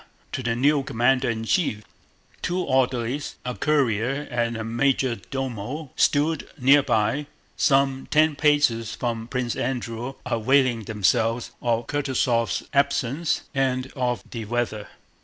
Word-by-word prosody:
to - - -3
the 120 -2 -1
new 140 +4 +3
commander 130 -1 +1
in 110 -1 -2
chief. 115 - 0 0.6
Two 180 0 -1
orderlies, 130 -2 0
a 125 - -2
courier 135 -1 0
and 120 -1 -1
a 110 - -4
major 125 +2 +1
domo, 135 +2 -4
stood 155 +2 +2
near 140 +2 +6
by, 140 +5 0 0.3
some 135 -1 +2
ten 155 0 +3
paces 145 -7 +2
from 115 -2 -3
Prince 125 -2 -2
Andrew, 120 0 -3
availing 120 -1 +2
themselves 115 +3 +1
of 115 -1 0
Kutúzov's 130 -5 0
absence 140 +2 +1
and 130 -1 0
of 125 -5 -1
the 115 - -5
fine - - -13
weather. 120 -3 -2
125 Hz, 130 wpm, -24 LUFS, 115-140 Hz, 0.6 s, near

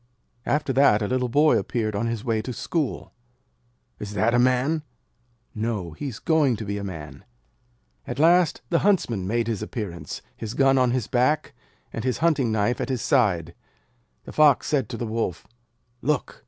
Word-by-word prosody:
After 145 -2 0
that, 120 -6 +4
a - - -1
little 125 +1 0
boy 150 +5 +4
appeared 110 -4 -2
on 110 +3 -1
his 115 0 -3
way 115 -2 0
to 125 +3 -5
school. 150 +4 -3 0.9
'Is 105 0 -6
that 110 +4 +2
a 120 - +4
Man?' 130 +5 +2 0.7
'No; 105 -6 -3
he 110 - -6
is 120 -6 -6
going 150 -6 +2
to 110 - -6
be 100 0 -3
a - - -6
Man.' 75 -8 -8 0.8
At - - -4
last 170 +1 +3
the 170 - +3
Huntsman 120 - +1
made 115 +3 0
his 110 -3 -2
appearance, 105 -6 -6
his 110 +1 -6
gun 135 -1 +4
on 125 -1 +3
his 125 -2 0
back, 130 +7 +1 0.4
and 115 - -4
his 125 -1 0
hunting 145 -7 +2
knife 110 +3 0
at - - -3
his 130 -3 -2
side. 95 - +2 0.7
The - - -9
Fox 150 -4 +5
said 135 -7 0
to 120 - -5
the 120 - -3
Wolf, 110 -6 -3 0.6
'Look! 145 +1 -1
120 Hz, 180 wpm, -24 LUFS, 105-135 Hz, 0.9 s, Fox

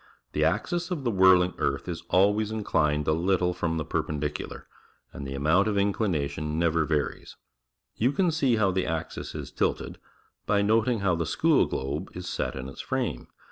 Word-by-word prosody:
The - - 0
axis 175 +1 0
o 180 - 0
f 140 - -8
the 120 - +1
whirling 95 -2 +5
earth - - -1
is 85 -2 -4
always 105 +3 +3
incl 110 -1 -3 0.3
ijied 75 0 -2
a - - +4
lit 90 +4 +2
tle 90 0 0
frorn 85 -2 -2
the 75 - -2
pprppridiciilar, 75 0 -3 0.5
and 70 - -6
the 70 - -5
amount 80 +9 +3
of 105 - 0
inclina 100 -6 +1
tion 75 +2 -4
never 85 -1 +2
varies. 75 -2 -2 0.6
You 125 +4 +2
can 175 +3 +1
see 140 -6 +2
how 105 -3 +2
the 95 0 -1
axis 80 -1 -4
is - - -6
tilted, - - -2 0.5
by 100 -1 +3
noting 110 +2 +2
how 95 -2 +2
the 85 -1 -1
school - - +3
globe 70 +7 -3
is 90 0 -6
set 65 - -2
in 65 0 -5
its 70 - -8
frame. - - -3
90 Hz, 195 wpm, -27 LUFS, 75-105 Hz, 0.6 s, whirling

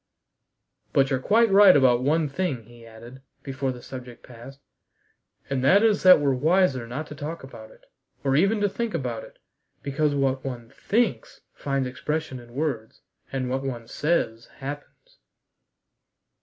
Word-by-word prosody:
"But 135 0 +3
you're 130 - +1
quite 220 - +3
right 195 -4 +8
about 125 -3 +4
one 155 +4 +1
thing," 140 -5 -3
he 120 +1 -16
added, 115 +4 -13 0.2
before 135 -1 -3
the 125 -1 -10
subject 125 -2 -10
passed, 125 +3 -13 0.9
"and 135 -2 -2
that 195 +10 +5
is 215 -2 +3
that 185 -3 +8
we're 140 -2 +1
wiser 145 -3 +2
not 135 +6 -5
to - - -7
talk 150 +2 -6
about 110 -5 -11
it, - - -21 0.4
or 135 -1 +1
even 195 +8 +3
to 205 - +3
think 225 0 -3
about 125 -7 -3
it, - - -15 0.5
because 145 +1 0
what 135 -1 0
one 120 -3 -7
thinks 220 +9 -1
finds 140 -2 -2
expression 140 +1 -4
in 120 0 -15
words, 130 -7 -3 0.3
and 130 -2 -2
what 130 +1 -2
one 120 -4 -5
says, 120 -8 -1
happens." 145 - -9
135 Hz, 155 wpm, -25 LUFS, 125-160 Hz, 0.9 s, right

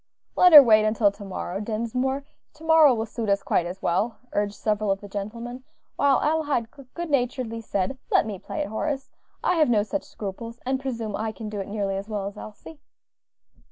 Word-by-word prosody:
"Let 360 - +6
her 295 -3 +12
wait 215 -3 +5
until 215 -1 +3
to 200 +1 -12
morrow, 190 -1 -5
Dinsmore; 235 +6 -2 0.3
tomorrow 320 -3 +5
will 225 0 -2
suit 225 -1 -4
us 200 0 +2
quite 175 - +1
as 185 +2 -8
well," 210 +7 0 0.2
urged 205 0 -1
several 215 0 -1
of 195 0 +1
the 205 - -10
gentlemen, 230 +5 -6 0.3
while 280 -1 +3
Adelaide 295 -7 0 0.3
good 345 -2 -4
naturedly 245 -3 -1
said, 200 +4 -2
"Let - - +3
me 205 -4 -5
play 200 - -5
it, 195 - -3
Horace; 270 +5 -3 0.3
I 360 - +2
have 310 -5 +4
no 215 -3 +3
such 285 +8 -3
scruples, 230 +4 -7
and 260 +1 0
presume 230 -6 -4
I 220 +1 -2
can 215 0 -7
do 210 -1 -5
it 195 - -4
nearly 200 -2 -2
as 200 +2 -6
well 205 -2 -3
as 200 +1 -6
Elsie." 215 +9 -11
220 Hz, 195 wpm, -25 LUFS, 205-265 Hz, 0.3 s, her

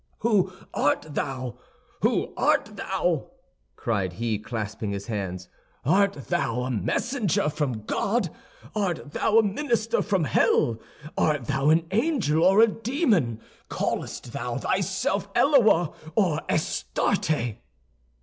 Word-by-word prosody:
"Who 205 -5 +2 0.2
art 145 +1 +1
thou? 130 -4 -3 0.4
Who - - +1
art - - +1
thou?" - - -1 0.5
cried 100 -6 -1
he, 110 +2 -2
clasping 110 -1 -4
his 100 0 -4
hands. 95 -5 -4 0.4
"Art 195 +6 +4
thou 120 +1 0
a 130 - -2
messenger 180 - 0
from 135 -8 -2
God; 225 - 0 0.4
art 180 -8 -2
thou 220 +7 +2
a 225 - +7
minister 230 +1 0
from 195 -5 +1
hell; 115 -3 +2 0.4
art 150 -5 +1
thou 135 +2 +1
an 160 +1 +4
angel 210 - +1
or 195 +3 +6
a 230 - +8
demon; 220 - 0 0.3
callest - - -3
thou - - -3
thyself - - -1
Eloa 220 - +4 0.2
or 175 -8 +2
Astarte?" 120 - 0
150 Hz, 120 wpm, -26 LUFS, -, 0.5 s, a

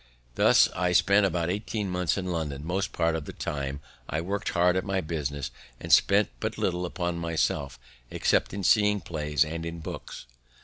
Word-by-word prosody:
Thus - - +5
I 90 0 +1
spent 100 +2 +5
about 85 -1 -1
eighteen 105 +1 -3
months 90 0 0
in 95 - -3
London; 80 -5 -3
most 95 +4 -1
part 85 -1 +1
of 80 -3 -4
the - - -8
time 70 -1 -4 0.3
I 80 - -1
work'd 100 +5 -2
hard 90 -1 +3
at 95 - 0
my 95 -1 -1
business, 70 -5 -3 0.3
and - - 0
spent 100 +1 +5
but - - -3
little 90 0 -1
upon 85 -1 -3
myself 80 -5 -1 0.3
except - - +1
in 100 0 -5
seeing 105 0 +4
plays 75 -3 0
and 80 +2 -5
in 85 0 -5
books. 80 - -8
85 Hz, 180 wpm, -27 LUFS, 80-95 Hz, 0.3 s, Thus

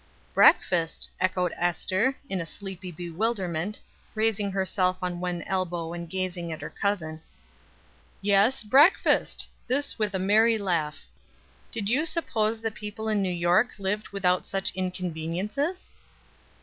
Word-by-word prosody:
"Breakfast!" 165 -3 +4
echoed 185 -2 +1
Ester, 185 +8 +1
in 190 -6 -2
a - - -4
sleepy 190 +1 -6
bewilderment, 180 +1 -2 0.4
raising 215 -2 +1
herself 190 -1 +1
on 175 -1 -2
one 180 -1 -3
elbow, 175 -3 -2
and 170 -1 -6
gazing 180 -2 -3
at 160 - -5
her - - -6
cousin. 160 -6 -2 1.0
"Yes, 205 +5 +3
breakfast!" 280 - +4 0.2
this 275 0 0
with 210 -2 +1
a - - +2
merry 220 +4 +4
laugh 170 -7 -1 0.7
"Did 210 -3 -3
you 280 +9 +2
suppose 225 -10 0
that 225 -2 -2
people 210 +1 -6
in 210 -2 +2
New 190 - 0
York 175 +6 +2
lived 205 +2 -2
without 180 -2 +1
such 195 -1 -1
inconveniences?" 185 - -3
190 Hz, 130 wpm, -27 LUFS, 175-215 Hz, 1.0 s, Breakfast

